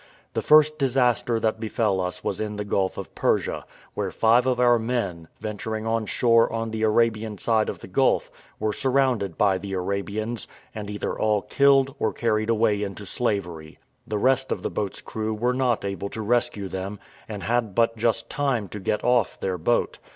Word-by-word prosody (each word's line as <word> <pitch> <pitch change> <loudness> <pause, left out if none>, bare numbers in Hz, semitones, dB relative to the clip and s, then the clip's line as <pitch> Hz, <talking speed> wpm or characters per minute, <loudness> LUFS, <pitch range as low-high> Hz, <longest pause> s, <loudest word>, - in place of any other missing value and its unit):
The - - -1
first 155 0 +5
disaster 125 -3 +2
that 110 0 0
befell 110 -3 0
us 90 0 -4
was 95 - -2
in 105 -1 -3
the 105 0 -4
Gulf 95 -2 0
of - - -7
Persia, - - 0 0.3
where - - -2
five 120 +3 +3
of 125 -1 +1
our 120 -1 +5
men, 100 -9 -2
venturing 110 +1 -4
on 115 -1 0
shore 115 0 +3
on 115 0 -3
the 110 0 -3
Arabian 110 -1 +1
side 110 +1 +1
of - - -6
the - - -9
gulf, - - +1 0.3
were 110 0 0
surrounded 130 - +1
by 95 -3 +3
the 100 +1 -6
Arabians, 100 +4 -3 0.3
and 105 -2 -6
either 105 0 -3
all 105 -2 +1
killed 135 +1 +3
or - - +1
carried 110 -1 0
away 110 -2 +2
into 100 0 -5
slavery; 90 -9 -3 0.3
the 105 - -2
rest 130 +4 +2
of - - -2
the - - -2
boat's 100 -2 -3
crew 110 0 -3
were 120 +3 0
not 125 -5 0
able 100 0 -3
to 110 - -5
rescue 120 -3 0
them, 95 +2 -5 0.3
and 105 -3 -6
had 115 -2 0
but 115 0 +3
just 115 0 0
time 135 -8 -1
to 105 - -7
get 105 +2 -1
off 125 -3 +2
their 95 -2 -2
boat. 120 +9 0
110 Hz, 190 wpm, -25 LUFS, 100-120 Hz, 0.3 s, first